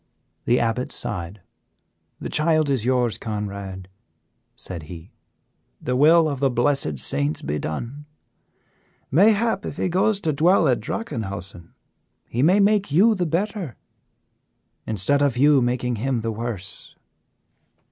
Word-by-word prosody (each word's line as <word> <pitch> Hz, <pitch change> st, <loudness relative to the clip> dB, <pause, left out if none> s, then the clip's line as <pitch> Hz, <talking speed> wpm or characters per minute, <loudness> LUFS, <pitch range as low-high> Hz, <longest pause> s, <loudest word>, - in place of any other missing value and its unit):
The 120 Hz, -, +3 dB
Abbot 120 Hz, +2 st, -1 dB
sighed. 90 Hz, +3 st, -5 dB, 0.8 s
"The -, -, -5 dB
child 155 Hz, -2 st, +2 dB
is 125 Hz, -5 st, 0 dB
yours, 125 Hz, -3 st, +1 dB
Conrad," 100 Hz, -4 st, -5 dB, 0.7 s
said 90 Hz, -3 st, -5 dB
he, 85 Hz, 0 st, -10 dB, 0.7 s
"the 125 Hz, -, -2 dB
will 160 Hz, +4 st, +5 dB
of 140 Hz, -3 st, -3 dB
the 135 Hz, 0 st, +2 dB
blessed 120 Hz, -, 0 dB
saints 70 Hz, +4 st, -2 dB
be 75 Hz, +1 st, -2 dB
done. 120 Hz, -, -5 dB, 1.1 s
Mayhap 210 Hz, -, +3 dB
if -, -, -6 dB
he -, -, 0 dB
goes 195 Hz, +3 st, +2 dB
to 155 Hz, -4 st, 0 dB
dwell 170 Hz, +3 st, +4 dB
at 125 Hz, -3 st, +2 dB
Drachenhausen 100 Hz, -, -6 dB, 0.5 s
he 120 Hz, -, -2 dB
may 180 Hz, +8 st, +4 dB
make 205 Hz, -3 st, +2 dB
you 205 Hz, +9 st, +5 dB
the 180 Hz, -4 st, -1 dB
better 180 Hz, -, -2 dB, 1.1 s
instead 110 Hz, +7 st, +1 dB
of 140 Hz, -4 st, +1 dB
you 145 Hz, +1 st, +5 dB
making 125 Hz, 0 st, -1 dB
him 125 Hz, +1 st, -1 dB
the 115 Hz, 0 st, -2 dB
worse." 105 Hz, -5 st, -6 dB
125 Hz, 130 wpm, -23 LUFS, 105-160 Hz, 1.1 s, will